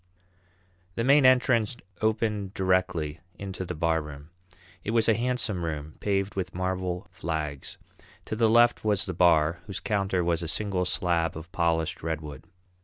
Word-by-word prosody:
The 115 - -1
main 140 +1 +6
entrance 125 -2 +3 0.2
opened 110 -3 0
directly 90 -5 0 0.2
into 95 -2 -5
the 90 - -5
barroom. 75 -2 -2 0.5
It 110 - -2
was 115 - +3
a 115 - +5
handsome 115 -5 -1
room, 75 -2 -4
paved 100 -1 0
with 90 -2 -4
marble 90 -1 -2
flags. 75 -4 -4 0.5
To - - -3
the 115 0 +3
left 120 +1 +4
was 105 -2 +1
the 95 - -4
bar, 85 -2 +3
whose 100 -2 -4
counter 95 -3 0
was 85 0 0
a 85 - -4
single 95 +1 -1
slab 85 -3 0
of 80 +3 -10
polished 85 -2 0
redwood. 75 -3 -5
90 Hz, 150 wpm, -27 LUFS, 80-105 Hz, 0.5 s, main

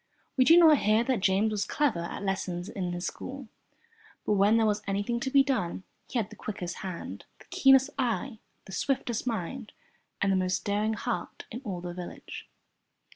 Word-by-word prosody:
We 255 - +4
do 330 +4 +8
not 320 -4 +7
hear 215 +2 +3
that 255 -2 0
James 200 +2 +2
was 210 -1 0
clever 285 - 0
at 170 +4 -5
lessons 185 -2 -2
in 185 -4 -3
his 175 +1 -4
school, 265 -3 -6 0.8
but - - +2
when 205 +3 +4
there 225 - +3
was 210 -1 +1
anything 205 +4 -1
to 265 - -2
be 275 0 +5
done, 215 -10 -1 0.2
he - - -3
had 220 -3 -1
the - - -10
quickest 180 -5 -5
hand, 185 -3 -6
the - - -18
keenest 270 +1 +5
eye, 245 -1 -1 0.3
the 190 - -11
swiftest 245 +3 -1
mind, 225 +2 -4 0.5
and 195 - +2
the - - +3
most 185 0 0
daring 210 +2 +1
heart 180 -4 -4
in 240 - -6
all 190 -7 -4
the 175 0 -5
village. 180 0 -8
210 Hz, 185 wpm, -29 LUFS, 190-255 Hz, 0.8 s, do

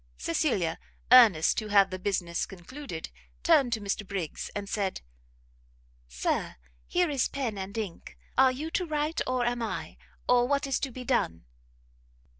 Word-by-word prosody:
Cecilia, 170 - 0 0.3
earnest 220 -11 +7
to 215 - -5
have 200 -2 +5
the 185 - -4
business 180 -3 -1
concluded, 195 - -8 0.3
turned 245 - +4
to 225 - 0
Mr 205 0 -2
Briggs, 190 -5 -4
and 205 -1 -4
said, 195 -2 -2 1.1
"Sir, - - -2 0.3
here 355 -3 +1
is 275 -4 +1
pen 260 -6 -3
and 195 +2 -6
ink: 200 -6 -6 0.2
are 260 0 +6
you 300 +5 -5
to 360 0 -1
write, 305 +1 -1
or 255 -1 +1
am 240 0 -1
I? 230 - -4 0.3
or 245 0 +4
what 285 +1 +1
is 270 -1 0
to 270 - -3
be 250 +1 -7
done?" 80 - 0
225 Hz, 155 wpm, -28 LUFS, 190-265 Hz, 1.1 s, earnest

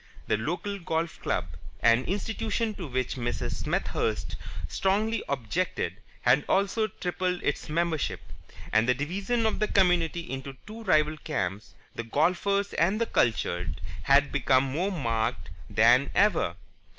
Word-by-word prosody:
The - - +2
local 175 - -3
golf 165 -2 -2
club, - - 0 0.4
an 115 +2 +4
institution 220 +3 -1
to 180 -5 -6
which 130 0 -2
Mrs. 120 0 -2
Smethurst - - -1 0.3
strongly 210 +3 +1
objected, 130 - -1 0.2
had 125 +4 +4
also 200 +3 +2
tripled 180 -2 -2
its 145 - -1
membership; 165 -1 0 0.5
and 110 +3 +4
the 125 - +4
division 195 - -1
of 220 - +1
the 215 - +2
community 175 -4 +2
into 135 0 -6
two 220 +2 -9
rival 155 -4 +3
camps, 95 -6 -3 0.2
the - - -4
Golfers 185 - +1
and 190 +6 +2
the 230 - +2
Cultured, 90 - 0 0.2
had 140 +6 +4
become 130 -2 +3
more 160 +9 -1
marked 115 - -1 0.2
than 120 +5 +5
ever. 175 - +3
160 Hz, 135 wpm, -28 LUFS, 125-195 Hz, 0.5 s, than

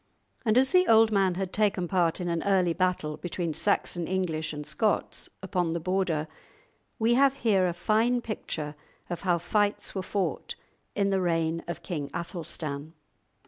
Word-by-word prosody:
And 225 -1 +3
as 265 +1 +4
the 365 0 +5
old 225 0 +6
man 195 -3 +2
had 190 0 -3
taken 200 -4 +1
part 175 -2 +1
in 180 - -3
an 170 -1 0
early 185 -4 +2
battle 175 -4 0
between 170 -1 -3
Saxon 175 -2 0
English 175 -4 -1
and 150 -1 -6
Scots, 215 +5 -1
upon 180 -3 0
the 170 - -1
Border, 175 -3 0 0.7
we 230 +1 +3
have 275 +2 +4
here 195 -5 +4
a 175 - -1
fine 220 +7 +2
picture 160 -10 -4 0.4
of 175 - -3
how 180 -3 +2
fights 205 +4 0
were 190 - -2
fought 195 +1 -2 0.4
in 200 -1 +1
the 190 -1 +2
reign 165 -1 0
of 170 - -5
King 150 -6 -4
Athelstan. 160 -3 -5
180 Hz, 165 wpm, -28 LUFS, 165-205 Hz, 0.7 s, old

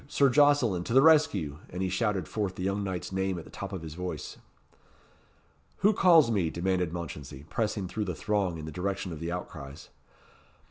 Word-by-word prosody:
Sir 140 -1 +3
Jocelyn! 135 -10 +4
to 115 - -2
the 135 - +8
rescue!" 100 - +4
And 90 +1 -4
he 95 - 0
shouted 95 -3 0
forth 100 -4 -2
the 90 - -5
young 100 +2 -1
knight's 95 -2 -4
name 95 -1 -1
at 85 - -6
the - - -14
top - - -6
of 95 -4 -5
his 80 -2 -7
voice. 90 +2 -6 1.4
"Who 205 +2 +5
calls 165 - +5
me?" 95 -7 +1
demanded 90 0 -1
Mounchensey, 75 -5 -7
pressing 105 -4 -1
through 105 +3 -3
the 90 -4 -3
throng 100 -3 -1
in 80 - -7
the 80 - -6
direction 95 +2 -3
of 80 - -7
the 85 +1 -4
outcries. 75 -5 -7
95 Hz, 190 wpm, -29 LUFS, 85-105 Hz, 1.4 s, the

